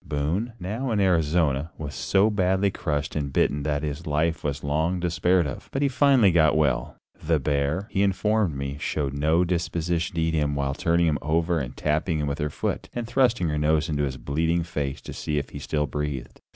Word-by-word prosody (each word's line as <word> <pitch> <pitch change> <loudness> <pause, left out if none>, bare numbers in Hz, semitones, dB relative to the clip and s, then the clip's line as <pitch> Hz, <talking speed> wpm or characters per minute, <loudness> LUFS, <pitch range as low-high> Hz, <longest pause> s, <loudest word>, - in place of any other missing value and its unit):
Boone, 85 +11 -2
now 110 +9 -3
in 110 -3 +1
Arizona, 80 -5 +2
was 75 -2 -6
so 100 +3 +2
badly 95 0 +2
crushed 75 -5 -2
and 70 -3 -2
bitten 70 +2 +1
that 75 0 -1
his 75 +3 -4
life 80 +2 0
was 70 -2 -3
long 80 +5 0
despaired 90 0 +2
of, 70 - -6
but 135 - -1
he - - +4
finally 130 -6 +4
got 80 -2 +4
well. 70 -5 +1 0.3
The 80 0 +2
bear, 70 +7 -1
he 100 -1 +1
informed 100 -3 +1
me, 70 +1 -4
showed 70 -3 -2
no 80 +5 +2
disposition 85 -1 -1
to 85 - 0
eat 80 0 +1
him 75 -2 0
while 70 -1 -1
turning 85 +2 +2
him 75 -2 +1
over 80 +2 +1
and 65 -2 -6
tapping 80 +2 0
him 75 - -1
with 70 +1 -3
her 75 0 -1
foot - - -3
and 120 -1 -2
thrusting 120 -6 +2
her 75 0 -1
nose 80 +2 +2
into 75 -2 0
his 65 -2 -2
bleeding 80 +5 0
face 75 -5 -4
to - - -8
see 75 - -3
if 70 - -3
he - - -7
still 75 -1 -1
breathed. 75 -3 -5
80 Hz, 205 wpm, -25 LUFS, 75-90 Hz, 0.3 s, he